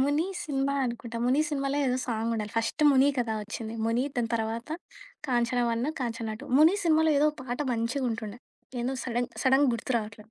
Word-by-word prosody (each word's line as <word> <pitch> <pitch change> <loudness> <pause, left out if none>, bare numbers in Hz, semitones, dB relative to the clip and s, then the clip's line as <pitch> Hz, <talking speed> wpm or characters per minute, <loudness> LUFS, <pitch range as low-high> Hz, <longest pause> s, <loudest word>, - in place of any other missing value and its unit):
'ముని' 290 +5 +2 0.2
cinema 280 -1 0
అనుకుంటా. 235 -1 -4
'ముని' 265 +5 +3
సినిమాలో 275 -1 -1
ఏదో 250 0 +1
సాంగుండాలి. 225 -2 -2
ఫస్ట్ 230 +7 0
'ముని' 275 +1 +5
కదా! 230 -3 0
వచ్చింది 225 +1 -6
ముని 235 +3 +1
దాని 235 -2 0
తర్వాత 225 +2 -2 0.6
'కాంచన 240 0 +1 0.2
1', 250 +7 -1
'కాంచన 230 -2 -3
2' - - -9
ముని 320 +5 +7
సినిమాలో 320 -1 +4
ఏదో 300 +1 +4
ఒక - - -22
పాట 245 0 -4
మంచిగుంటుండే, 230 -2 -2 0.4
ఏందో 260 +2 -1
సడెన్ 245 0 -1
సడెన్‌గా 265 0 +5
గుర్తు 235 +3 -3
రావట్లేదు. 215 0 -9
245 Hz, 170 wpm, -28 LUFS, 230-275 Hz, 0.6 s, ముని